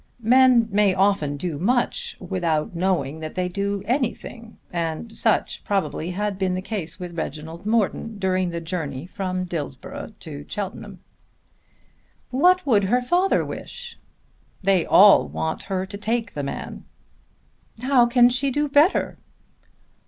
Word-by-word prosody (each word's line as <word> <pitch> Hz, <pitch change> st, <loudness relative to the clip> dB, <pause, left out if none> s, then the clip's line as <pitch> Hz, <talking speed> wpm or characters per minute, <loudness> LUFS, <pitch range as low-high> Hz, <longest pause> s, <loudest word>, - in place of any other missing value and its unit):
Men 250 Hz, 0 st, +5 dB
may 200 Hz, -1 st, +3 dB
often 190 Hz, -7 st, +1 dB
do 155 Hz, -1 st, -4 dB
much 250 Hz, -, 0 dB
without 175 Hz, -1 st, -1 dB
knowing 170 Hz, -5 st, 0 dB
that 155 Hz, -1 st, -7 dB
they 180 Hz, -1 st, 0 dB
do 200 Hz, +2 st, -2 dB
anything, 235 Hz, -2 st, -3 dB, 0.2 s
and 170 Hz, +6 st, -3 dB
such 225 Hz, 0 st, 0 dB
probably 175 Hz, -4 st, -1 dB
had 200 Hz, +1 st, -3 dB
been 185 Hz, -1 st, 0 dB
the 185 Hz, -, -3 dB
case 195 Hz, -6 st, -5 dB
with 175 Hz, -2 st, -7 dB
Reginald 160 Hz, +3 st, -6 dB
Morton 220 Hz, 0 st, 0 dB
during 185 Hz, -2 st, 0 dB
the 170 Hz, 0 st, -4 dB
journey 160 Hz, -5 st, -4 dB
from 185 Hz, 0 st, -3 dB
Dillsborough 160 Hz, -, -6 dB
to 145 Hz, -3 st, -8 dB
Cheltenham. 200 Hz, -2 st, -6 dB, 1.3 s
"What 360 Hz, +8 st, +4 dB
would 210 Hz, -8 st, +3 dB
her 245 Hz, +5 st, +2 dB
father 355 Hz, +9 st, +2 dB
wish?" 480 Hz, -1 st, -7 dB, 0.6 s
"They 190 Hz, -3 st, +2 dB
all 205 Hz, +1 st, +7 dB
want 160 Hz, 0 st, -3 dB
her 190 Hz, -1 st, -1 dB
to 200 Hz, +1 st, -8 dB
take 225 Hz, +1 st, -2 dB
the 145 Hz, -, -3 dB
man." 140 Hz, -, -6 dB, 1.0 s
"How 255 Hz, -2 st, +4 dB
can 240 Hz, 0 st, +5 dB
she 255 Hz, +3 st, +1 dB
do 295 Hz, +3 st, 0 dB
better?" 290 Hz, +6 st, +3 dB
195 Hz, 135 wpm, -23 LUFS, 170-235 Hz, 1.3 s, all